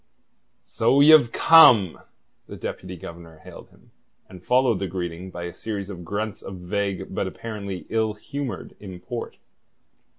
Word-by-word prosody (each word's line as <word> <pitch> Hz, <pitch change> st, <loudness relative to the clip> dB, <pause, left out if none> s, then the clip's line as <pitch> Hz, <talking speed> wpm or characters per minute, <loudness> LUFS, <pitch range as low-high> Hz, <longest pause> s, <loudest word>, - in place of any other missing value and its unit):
"So 120 Hz, +4 st, +1 dB
ye've 145 Hz, -4 st, +7 dB
come," 120 Hz, -, +6 dB, 0.5 s
the -, -, -9 dB
Deputy 90 Hz, 0 st, -7 dB
Governor 85 Hz, -1 st, -11 dB
hailed -, -, -13 dB
him, -, -, -25 dB, 0.4 s
and 90 Hz, -1 st, -14 dB
followed 125 Hz, -3 st, +2 dB
the 95 Hz, -, -2 dB
greeting 90 Hz, 0 st, -5 dB
by 85 Hz, -1 st, -8 dB
a 85 Hz, 0 st, -6 dB
series 100 Hz, 0 st, -6 dB
of 90 Hz, -2 st, -9 dB
grunts 100 Hz, +4 st, -4 dB
of 95 Hz, -, -8 dB
vague 95 Hz, +1 st, -4 dB
but 95 Hz, -, -2 dB
apparently 100 Hz, -2 st, -7 dB
ill 110 Hz, -1 st, -1 dB
humoured 140 Hz, +3 st, -6 dB
import. 100 Hz, +5 st, -8 dB
100 Hz, 140 wpm, -23 LUFS, 90-115 Hz, 0.5 s, ye've